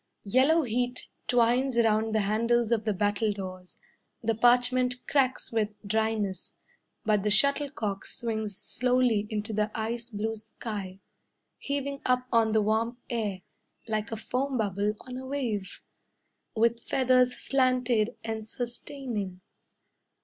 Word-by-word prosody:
Yellow 270 +10 +4
heat 245 +1 -2 0.2
twines 245 +1 +3
round 220 -1 +3
the 215 - +3
handles 230 +3 +2
of 225 -2 +1
the 215 - +2
battledores, 200 -3 -2 0.5
The 225 0 +2
parchment 245 +2 +3
cracks 260 -3 +1
with 220 -2 +1 0.2
dryness; 215 -3 -1 0.5
But 210 -2 +3
the 210 - 0
shuttlecock 220 -3 +1
Swings 220 -4 -3
slowly 245 -4 +1
into 215 0 -3
the 210 0 +1
ice 230 +2 -3
blue 220 0 -2
sky, 210 -3 -7 0.6
Heaving 280 0 -3
up 250 0 +2
on 225 -1 +4
the 220 -1 +4
warm 225 +3 +1
air 205 -6 -2 0.4
Like 215 0 -2
a 225 - -2
foam 260 +4 -1
bubble 205 -1 0
on 255 0 -7
a 260 0 -7
wave, 225 -9 -3 0.7
With 230 +1 +3
feathers 255 -1 +3
slanted 255 -4 +1
and 220 -1 -4
sustaining. 240 -6 -5
225 Hz, 125 wpm, -28 LUFS, 210-250 Hz, 0.7 s, Yellow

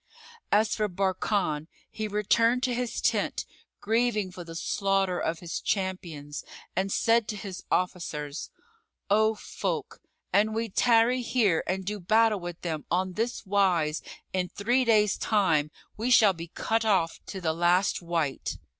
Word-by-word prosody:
As 210 +1 +3
for 215 -1 0
Barkan, 185 -4 0 0.2
he 215 -1 -3
returned 230 +4 +2
to 255 -2 +1
his 245 -1 -2
tent, - - 0 0.4
grieving 215 -2 +1
for 180 -1 -8
the 165 -1 -9
slaughter 195 0 0
of 160 0 -2
his 170 -2 -4
champions, 170 -7 -3 0.3
and 195 +1 0
said 230 0 +3
to 210 - -3
his 195 -2 -7
officers, 160 -5 -2 0.6
"O 220 +1 +4
folk, - - -4 0.3
an 210 +3 +3
we 225 +1 -2
tarry 235 +4 +3
here 220 -9 +2
and 190 0 -2
do 210 +1 -3
battle 215 +3 +3
with 175 -1 -7
them 160 -3 -3
on 185 +1 0
this 230 +3 -2
wise 180 -6 +2 0.3
in 180 -1 0
three 240 +5 +1
days' 210 -3 +3
time 165 -9 +2 0.3
we 230 +4 -1
shall 215 -5 +6
be 170 -1 -8
cut 225 +6 -1
off 190 -7 +1
to 195 - -5
the 160 -3 0
last 175 +4 +2
wight." 165 -5 -2
195 Hz, 150 wpm, -28 LUFS, 175-220 Hz, 0.6 s, shall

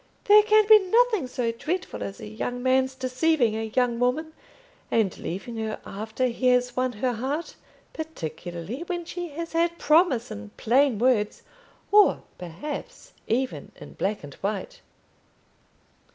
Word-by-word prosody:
There 420 +1 +8
can 430 0 +4
be 435 -1 +9
nothing 430 - +2
so 245 -2 -1
dreadful 335 +10 -4
as 195 - -5
a - - -8
young 245 +3 -4
man's 260 0 +2
deceiving 255 -2 +1
a 220 0 -4
young 245 -2 +2
woman 295 +6 0 0.6
and 215 -5 +1
leaving 215 +7 -5
her 220 -1 -3
after 220 +5 -3
he 255 +1 0
has 250 0 +3
won 255 0 0
her 245 +4 -1
heart 275 +8 -3 0.4
particularly 175 - -6
when 350 -2 -3
she 350 +1 -5
has 330 +3 -6
had 335 +1 +3
his 340 - -24
promise 305 -7 +3
in 100 0 -7
plain 255 +1 +3
words, 225 -3 +1 0.5
or, 415 0 +5 0.2
perhaps, 280 - -7
even 255 +3 -2
in - - -12
black 205 -2 -2
and 145 -1 -9
white." 215 - -4
255 Hz, 150 wpm, -25 LUFS, 220-325 Hz, 0.6 s, be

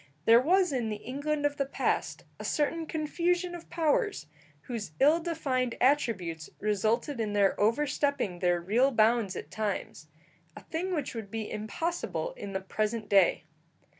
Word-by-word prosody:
There 230 +1 +7
was 360 +3 +3
in 240 -4 -1
the 210 - -2
England 290 +6 -3
of 290 0 0
the 275 - +1
past - - -1 0.2
a - - -6
certain 320 +2 0
confusion 350 +3 0
of 345 -1 -9
powers, 350 - 0 0.4
whose 205 - -6
ill 300 +5 +5
defined 275 -8 -1
attributes 190 - +1
resulted 220 +6 0
in 215 -2 -1
their 200 -1 +4
overstepping 260 -3 +1
their 175 -1 +2
real 225 +10 +3
bounds 225 -4 +2
at - - -7
times 205 -7 -3 0.5
a - - -9
thing 355 +4 -3
which 295 -5 -3
would 225 -4 -6
be 220 0 -4
impossible 335 - -3
in 200 - -7
the 190 - -2
present 215 +3 -2
day. 195 -3 +4
245 Hz, 155 wpm, -29 LUFS, 210-305 Hz, 0.5 s, There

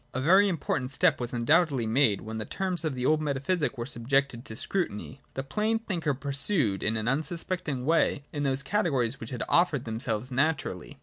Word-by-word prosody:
(i) - - 0
A - - -2
very 190 +6 +6
important 145 -7 -2
step 155 +2 +3
was 120 - -3
undoubtedly 135 +1 +2
made, 110 -2 +2
when 110 0 -6
the - - -2
terms 185 -2 -2
of 155 -4 -1
the 125 0 -2
old 155 +2 +3
metaphysic 145 +1 -1
were 120 - -3
subjected 130 -1 0
to 110 - -6
scrutiny. 135 - -3
The 135 - -2
plain 215 +10 0
thinker 170 -10 -2
pursued 140 - 0
his 110 +1 0
unsuspecting 145 +3 -2
way 155 -2 +2
in 145 - -2
those 135 -1 0
categories 135 - 0
which 115 - -7
had 125 - -3
offered 165 -7 +3
themselves 115 +1 -3
naturally. 140 +3 -1
140 Hz, 185 wpm, -28 LUFS, 120-165 Hz, -, very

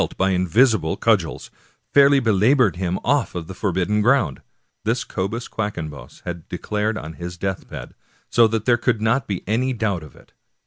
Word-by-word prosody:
200 - - -3
Washington 95 - +2
Irving 95 -2 +2
by - - +1
invisible 110 -6 +3
cudgels, 105 -8 0 0.4
fairly 140 0 +6
belabored 115 0 +3
him 90 0 -1
off 135 -8 +1
of 85 -2 -4
the 95 - -8
for 100 +1 -1
bidden 95 +4 +1
ground. 105 - +2 0.4
This 115 +4 0
Cobus 110 +4 -3
Quackenbos 85 -9 -6
had 85 -2 -6
declared 105 +1 -2
on 80 -5 -7
his 90 0 -6
deathbed, 95 0 -5 0.3
so 115 -1 +5
that 110 -1 -2
there 120 -2 +4
could 120 -1 0
not 115 +5 +1
be 100 -3 -3
any 125 +6 0
doubt 105 -7 -1
of 75 - -13
it. - - -20
105 Hz, 185 wpm, -22 LUFS, 90-115 Hz, 0.4 s, fairly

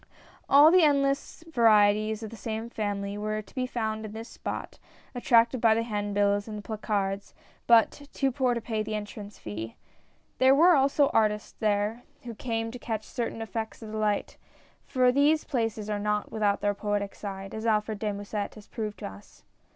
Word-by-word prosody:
All 290 +3 +8
the 365 +1 +6
endless 280 0 +1
varieties 215 -3 +4
of 220 - -6
the - - -8
same 225 +1 -5
family 205 -2 -3
were 215 0 -2
to 215 - -12
be 255 -1 -2
found 220 -3 -3
in 215 -1 -7
this 225 +1 -7
spot, - - -6 0.3
attracted 240 0 +3
by 225 -2 +5
the 230 - 0
hand 205 -3 -3
bills 205 0 +2
and 215 -1 -6
the - - -6
placards, 200 -2 -3 0.3
but 235 +5 +4
too 270 -1 0
poor 255 -1 +1
to 235 - -3
pay 220 -1 -2
the 215 0 -3
entrance 210 0 -7
fee. 110 +2 -7 0.6
There 260 +1 +6
were 345 +5 +6
also 280 +1 +3
artists 210 -1 +1
there, 210 +2 0 0.2
who 240 -1 -6
came 225 0 -3
to 250 - -8
catch 220 -3 -3
cer 235 -2 -3
tain 225 - -6
effects 225 0 -5
of 215 -1 -8
light, 215 -1 -1 0.5
for 255 -1 +3
these 290 +4 +3
places 225 -5 -2
are 210 -1 -2
not 210 0 -1
without 210 -2 +1
their 205 0 +1
poetic 205 -1 -2
side, 195 -1 -7
as 220 +1 -4
Alfred 215 -1 +1
de 210 0 -1
Musset 205 0 -4
has 210 -2 -13
proved 215 -2 -5
to - - -6
us. 100 +1 -14
220 Hz, 190 wpm, -28 LUFS, 205-235 Hz, 0.6 s, All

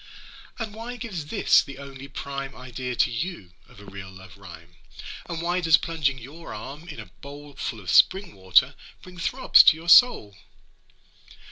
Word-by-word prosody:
'And 225 -3 -6
why 230 +3 -7
gives 200 - -6
this - - +3
the 140 -1 -10
only 140 -1 -10
prime 140 0 -7
Idea 125 0 -6
to - - +1
you 120 - -5 0.2
of - - -18
a 100 - -14
real 100 -1 -10
love 95 0 -14
rhyme? 85 -3 -14 0.5
And 170 -1 -5
why 175 +1 -1
does 165 -2 +5
plunging 150 -5 -2
your 145 +7 -10
arm 145 +6 -9
in 150 - -9
a 110 - -8 0.2
bowl 145 +1 -11
Full 125 -4 -5
of 90 -5 -5
spring 190 - +3
water, 95 +8 +3 0.3
bring 180 -1 -13
throbs 255 +10 +5
to 155 - +5
your 165 +2 -7
soul?' 165 - +5
140 Hz, 170 wpm, -24 LUFS, 110-170 Hz, 0.5 s, does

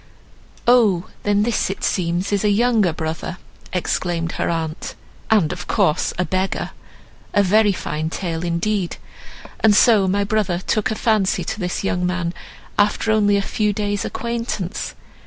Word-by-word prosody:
"Oh, 215 -8 +4
then, 205 0 +2
this 235 -3 0
it 195 - -5
seems 180 +2 0
is 200 - +1
a 210 - +3
younger 215 -3 +3
brother," 160 +3 -4 0.3
exclaimed 175 -2 -1
her - - -2
aunt, 160 -1 -3 0.3
"and 200 -9 +3
of - - -8
course 155 - +2
a 180 - +1
beggar. 185 +3 -1 0.6
A 205 - +5
very 210 +2 +4
fine 155 -4 -3
tale 165 -1 -3
indeed! 175 +2 -1 0.6
And 215 -2 +5
so 210 -3 +5
my 200 +2 +1
brother 200 -4 0
took 210 +3 0
a 220 - -1
fancy 210 -5 +1
to 215 - -4
this 180 0 -2
young 180 -2 0
man 180 -1 -1 0.5
after 210 +2 +2
only 205 -2 +3
a 200 - 0
few 210 +1 0
days 205 0 -1
acquaintance! 230 -5 -3
195 Hz, 155 wpm, -21 LUFS, 175-215 Hz, 0.6 s, A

